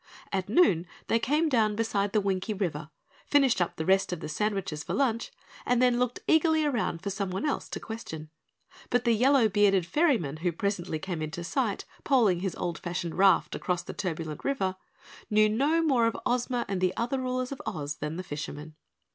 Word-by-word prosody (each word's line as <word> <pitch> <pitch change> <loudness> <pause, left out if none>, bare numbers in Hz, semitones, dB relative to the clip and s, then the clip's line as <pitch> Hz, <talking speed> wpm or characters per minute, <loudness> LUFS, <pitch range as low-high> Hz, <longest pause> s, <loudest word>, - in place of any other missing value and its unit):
At 190 0 -1
noon 195 - +4 0.2
they 230 - +3
came 300 +8 +1
down 220 -7 +2
beside 205 -3 0
the 215 - +3
Winkie 195 +2 -1
River, 160 -6 -3 0.4
finished 270 -9 +3
up 175 - 0
the 160 - -3
rest 190 +1 +3
of 180 - -3
the 160 - -6
sandwiches 195 -2 -2
for - - -3
lunch, 235 -5 0 0.3
and 245 -1 +2
then 245 -1 +3
looked 250 0 -1
eagerly 315 -1 +4
around 225 - -1
for 200 - -2
someone 195 +3 -3
else 290 - -2
to - - -4
question. 160 -9 -7 0.6
But 245 0 +2
the 235 - +4
yellow 250 +1 +4
bearded 200 -3 +3
ferryman 185 - +1
who 175 +2 -1
presently 185 -2 -2
came 170 0 -4
into 155 +3 -4
sight 220 +3 -1 0.2
poling 220 -10 +3
his 185 -2 -3
old 175 -2 -3
fashioned 175 -1 -4
raft 190 -2 +4
across 180 -2 -2
the - - -7
turbulent 160 -4 -4
river 195 -10 0 0.5
knew 215 0 +5
no 285 +10 +2
more 255 -7 +3
of 230 - -2
Ozma 245 0 0
and 190 -2 -2
the 185 0 +1
other 245 +3 -1
rulers 255 0 -2
of 275 - -6
Oz 150 -4 -4
than 150 +2 -4
the 185 - -4
fisherman. 150 -1 -6
200 Hz, 190 wpm, -28 LUFS, 175-245 Hz, 0.6 s, knew